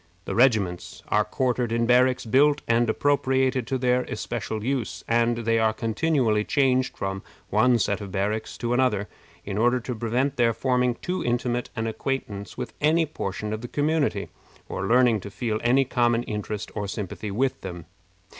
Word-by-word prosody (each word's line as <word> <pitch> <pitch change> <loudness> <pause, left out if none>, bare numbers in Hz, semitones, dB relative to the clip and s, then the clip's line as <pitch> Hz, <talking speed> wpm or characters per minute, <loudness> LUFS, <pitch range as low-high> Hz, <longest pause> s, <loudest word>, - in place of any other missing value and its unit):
The - - -3
regiments 105 -7 +1
arc 105 0 +2
quartered 125 -2 0
in 115 0 +1
barracks 125 +1 +3
built 145 +6 +3
and 115 0 +2
appropriated 130 -1 +1
to 130 - 0
their 125 0 +2
especial 110 -1 -4
use, 130 -2 -2
and 115 0 +2
they 115 0 +3
are 110 0 +2
continually 115 -1 +1
changed 130 0 +1
from 95 0 -3 0.3
one 120 +4 +4
set 100 -1 0
of 100 -2 -7
barracks 105 +3 -2
to 120 0 -1
another, 120 -5 +1 0.4
in 100 +1 -3
order 120 +2 +3
to 125 - -4
prevent 120 +5 -1
their 115 -2 +3
forming 125 +1 +1
too 180 +1 -2
intimate 120 0 -1
an 115 -2 -2
acquaintance 110 -3 -4
with - - -5
any 160 +2 +3
portion 105 -7 -4
of 110 - -4
the 120 - -6
community, 145 - 0 0.4
or - - -3
learning 120 -2 +4
to 100 - -8
feel 110 +1 -2
any 130 +3 +4
common 120 -2 +1
interest 105 -1 -5
or 105 -1 -3
sympathy 105 +1 -5
with 130 +6 -1
them. 90 -3 -7
120 Hz, 170 wpm, -25 LUFS, 105-130 Hz, 0.4 s, one